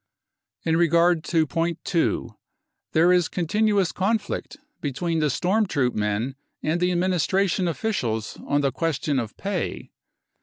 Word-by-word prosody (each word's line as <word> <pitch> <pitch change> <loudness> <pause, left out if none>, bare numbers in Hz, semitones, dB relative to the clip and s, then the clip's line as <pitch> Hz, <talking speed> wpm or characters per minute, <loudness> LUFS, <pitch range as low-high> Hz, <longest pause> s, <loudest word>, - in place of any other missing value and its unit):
u 160 - +1
In 160 - +3
regard 170 0 +3
to 165 -3 +2
point 165 +2 -1
2: 170 -3 0 0.6
there 170 +3 +5
is 180 -2 +3
continuous 200 +1 +1
conflict 205 +8 -2 0.2
be 145 - -1
H 135 - -9
tween 165 +1 0
the 150 -1 +2
storm 195 - +1
troop 135 -8 +1
men 105 +5 -1 0.3
and 160 +3 0
the 180 0 +2
administration; 185 +1 +1
officials 125 - -2
on 145 0 +2
the 140 -1 +1
question 150 -3 -1
of 115 -3 -5
pay. 195 -3 -3
170 Hz, 150 wpm, -24 LUFS, 145-185 Hz, 0.6 s, there